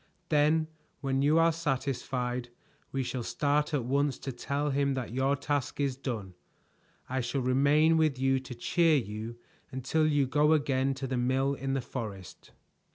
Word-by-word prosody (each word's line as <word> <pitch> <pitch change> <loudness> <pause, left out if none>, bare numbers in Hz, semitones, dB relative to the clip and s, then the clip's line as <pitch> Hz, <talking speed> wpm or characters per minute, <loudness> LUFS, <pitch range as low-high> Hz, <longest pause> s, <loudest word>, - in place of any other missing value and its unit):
"Then 155 +1 +3 0.3
when 135 -1 0
you 150 +3 +4
are 165 0 +5
satisfied 130 -5 -2 0.4
we 135 -1 -1
shall 125 0 -3
start 145 +5 0
at 140 -6 -1
once 140 +1 +1
to 135 - -5
tell 140 +4 -2
him 140 0 +1
that 125 -3 -4
your 135 +2 +2
task 140 -1 -2
is 140 -2 0
done. 115 -8 -5 0.7
I 130 0 -1
shall 125 +3 -2
remain 145 +5 +4
with 155 -4 +2
you 135 0 +2
to 130 -1 -9
cheer 165 +6 +3
you 110 0 -5 0.3
until 135 +5 0
you 145 -2 +3
go 150 +4 +3
again 135 -3 +1
to 135 0 -4
the 130 -1 -2
mill 130 +3 +1
in 135 -1 -3
the 135 - 0
forest." 105 -7 -7
135 Hz, 165 wpm, -29 LUFS, 125-145 Hz, 0.7 s, are